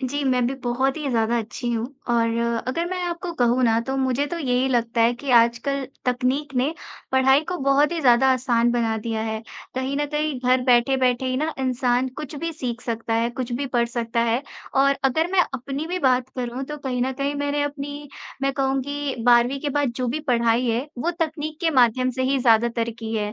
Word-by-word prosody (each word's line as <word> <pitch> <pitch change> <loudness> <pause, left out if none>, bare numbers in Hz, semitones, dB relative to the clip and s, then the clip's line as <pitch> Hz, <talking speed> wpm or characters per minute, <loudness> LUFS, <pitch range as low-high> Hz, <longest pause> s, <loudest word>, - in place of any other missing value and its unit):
जी, 280 +2 -2
मैं 250 -2 +2
भी 260 - -2
बहुत 260 +3 0
ही 300 -3 -3
ज़्यादा 230 0 +1
अच्छी 230 +2 -4
हूँ 230 -1 -1 0.3
और 230 -1 +2 0.3
अगर 335 +7 -1
मैं 370 - -2
आपको 345 0 -4
कहूँ 245 -2 +2
ना 225 -1 +3
तो 265 0 -2
मुझे 265 +1 0
तो 335 +4 -4
यही 255 -3 +1
लगता 235 -2 0
है 230 +1 +4
कि 265 +3 -5
आजकल 235 +4 +1 0.2
तकनीक 260 +3 -1
ने 265 +5 +1 0.4
पढ़ाई 265 +1 +5
को 360 - -1
बहुत 285 +3 +4
ही 335 - -2
ज़्यादा 260 -1 +5
आसान 240 -2 +2
बना 230 -2 0
दिया 220 0 -3
है। 220 0 -3 0.3
कहीं 260 +2 -2
न 290 0 0
कहीं 300 -2 -1
घर 255 0 +3
बैठे-बैठे 255 0 +3
ही 255 0 -1
ना 310 +3 -1
इंसान 255 -1 +1
कुछ 300 0 -6
भी 330 +3 -4
सीख 245 -6 -4
सकता 230 -1 -2
है, 230 +1 +1
कुछ 245 0 -5
भी 275 +3 -2
पढ़ 240 -2 +1
सकता 235 -1 -2
है 235 +2 +1 0.3
और 275 +1 +4
अगर 315 +6 +2
मैं 385 - +5
अपनी 275 +4 -4
भी 360 +2 -2
बात 255 -4 +2
करूँ, 250 +1 -3
तो 300 +2 -6
कहीं 255 -3 -2
न 265 - 0
कहीं 275 +2 -2
मैंने 285 0 -1
अपनी 290 0 -5 0.3
मैं 275 0 +1
कहूँ 270 0 0
कि 285 0 -3
12वीं 245 +3 +4
के 295 - -2
बाद 285 -3 0
जो 255 -1 -1
भी 300 +6 -2
पढ़ाई 235 +1 +2
है, 240 +5 -1
वो 330 +8 0
तकनीक 310 -1 -2
के 330 -2 +2
माध्यम 255 -1 +3
से 260 +1 -3
ही 270 +1 +1
ज़्यादातर 235 -1 +2
की 225 0 -5
है। 210 -1 -2
260 Hz, 215 wpm, -23 LUFS, 240-285 Hz, 0.4 s, पढ़ाई